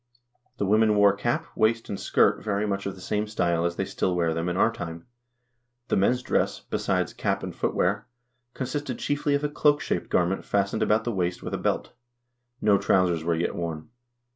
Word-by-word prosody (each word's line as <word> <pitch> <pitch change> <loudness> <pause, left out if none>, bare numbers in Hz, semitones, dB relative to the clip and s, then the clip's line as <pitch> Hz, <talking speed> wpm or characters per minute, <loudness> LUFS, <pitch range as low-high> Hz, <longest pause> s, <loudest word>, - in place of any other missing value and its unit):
The 100 - 0
women 110 +2 +4
wore 100 -1 +5
cap, 120 +4 -1
waist, 115 +1 +2
and 100 - -4
skirt, - - +2
very 105 -1 0
much 100 -1 -2
of 100 - -4
the 95 - -13
same 105 +3 -1
style 85 -5 0
as 85 0 -1
they 95 - -1
still 90 -1 -1
wear 85 -2 +1
them 85 +2 -2
in 90 - -2
our 115 - +4
time. 85 -6 -7 0.8
The - - +2
men's 125 +6 +2
dress, - - 0
besides - - -1
cap - - -1
and - - -5
footwear, 100 +4 0 0.5
con 130 - -3
sisted 135 0 -3
chiefly 145 0 0
of 140 - -1
a - - +2
cloak 145 0 +3
shaped - - -2
garment 90 +2 +1
fastened 100 -1 0
about 110 +1 +2
the 120 - -1
waist 90 -3 -2
with - - -5
a - - -1
belt. - - -1 0.7
No 105 -2 +4
trousers 90 -4 +2
were 85 0 +1
yet 85 +2 -1
worn. 80 -1 -5
100 Hz, 200 wpm, -26 LUFS, 90-110 Hz, 0.8 s, wore